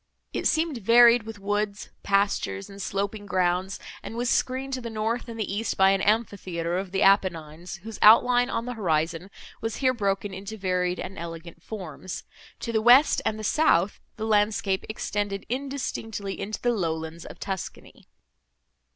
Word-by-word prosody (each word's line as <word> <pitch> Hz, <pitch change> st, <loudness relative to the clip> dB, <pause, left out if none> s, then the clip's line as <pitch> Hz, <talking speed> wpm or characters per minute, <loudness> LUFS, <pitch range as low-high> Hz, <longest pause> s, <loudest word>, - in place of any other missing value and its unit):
It -, -, +1 dB
seemed 315 Hz, -5 st, 0 dB
varied 235 Hz, +1 st, +6 dB
with 225 Hz, -1 st, -7 dB
woods, 205 Hz, 0 st, -2 dB
pastures, 195 Hz, -, 0 dB
and 200 Hz, 0 st, -9 dB
sloping 200 Hz, +2 st, -3 dB
grounds, 185 Hz, 0 st, 0 dB, 0.2 s
and 230 Hz, -, -7 dB
was 240 Hz, 0 st, 0 dB
screened 265 Hz, +1 st, 0 dB
to 260 Hz, -, -2 dB
the 235 Hz, -, -5 dB
north 225 Hz, +3 st, -2 dB
and 230 Hz, -1 st, -7 dB
the 205 Hz, -2 st, -2 dB
east 215 Hz, +1 st, -2 dB
by 190 Hz, 0 st, +6 dB
an 195 Hz, -1 st, +1 dB
amphitheatre 190 Hz, -6 st, 0 dB
of 190 Hz, -1 st, -6 dB
the 195 Hz, -, +1 dB
Apennines, 175 Hz, -3 st, +1 dB
whose 225 Hz, 0 st, -8 dB
outline 245 Hz, +3 st, +6 dB
on 230 Hz, -, -2 dB
the 250 Hz, -, -4 dB
horizon 165 Hz, -3 st, -1 dB, 0.3 s
was 225 Hz, -1 st, -2 dB
here 255 Hz, -1 st, +2 dB
broken 200 Hz, -3 st, -1 dB
into 200 Hz, +3 st, -7 dB
varied 180 Hz, -2 st, 0 dB
and 190 Hz, +1 st, -6 dB
elegant 170 Hz, 0 st, -8 dB
forms; 185 Hz, -3 st, -7 dB, 0.4 s
to 230 Hz, -, -3 dB
the 220 Hz, -1 st, +1 dB
west 250 Hz, +6 st, +6 dB
and 215 Hz, -, -1 dB
the 215 Hz, -, -7 dB
south, 205 Hz, -, +2 dB, 0.2 s
the 220 Hz, -, -4 dB
landscape 210 Hz, -2 st, +1 dB
extended 205 Hz, -2 st, -3 dB
indistinctly 245 Hz, -6 st, -4 dB
into 210 Hz, +2 st, -4 dB
the 245 Hz, -, +1 dB
lowlands 165 Hz, -4 st, -3 dB
of -, -, -10 dB
Tuscany. 190 Hz, -3 st, -7 dB
205 Hz, 165 wpm, -26 LUFS, 185-225 Hz, 0.4 s, varied